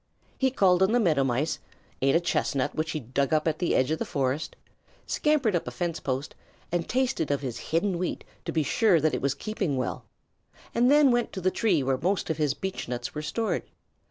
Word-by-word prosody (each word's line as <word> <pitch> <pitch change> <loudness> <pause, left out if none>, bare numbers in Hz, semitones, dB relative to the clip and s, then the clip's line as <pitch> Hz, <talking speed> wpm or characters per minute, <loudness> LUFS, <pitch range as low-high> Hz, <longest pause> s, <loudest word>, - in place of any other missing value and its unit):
He 265 - +3
called 190 -7 +3
on 190 +4 +4
the 245 - +4
Meadow 160 -10 +3
Mice, 135 +5 0 0.4
ate 135 +2 +3
a - - +6
chestnut 145 -4 0
which 155 +1 -2
he 155 - -2
dug 135 +3 -1
up 155 +1 +1
in 160 - +3
the 175 - +1
edge 130 +3 +2
of 160 - 0
the - - 0
forest, 140 +2 -2 0.5
scampered 285 -10 +1
up 170 - -1
a - - 0
fence 175 -2 -3
post 135 +2 -3 0.4
and 175 -1 -1
tasted 250 - 0
of 145 -1 0
his 125 -4 -4
hidden 170 +2 +1
wheat 180 - -3 0.2
to - - -2
be 160 - +1
sure 200 - +3
that 155 0 +1
it - - -1
was 140 0 0
keeping 190 -4 -2
well, 130 - -3 0.7
and 245 +2 +3
then 290 -2 +6
went 240 -1 +1
to 190 - -4
the 185 +1 +2
tree 185 - +2
where 130 0 0
most 180 0 0
of 160 - -2
his 150 -3 +1
beechnuts 125 -10 -4
were 150 - -4
stored. 215 +9 -1
160 Hz, 215 wpm, -27 LUFS, 140-200 Hz, 0.7 s, a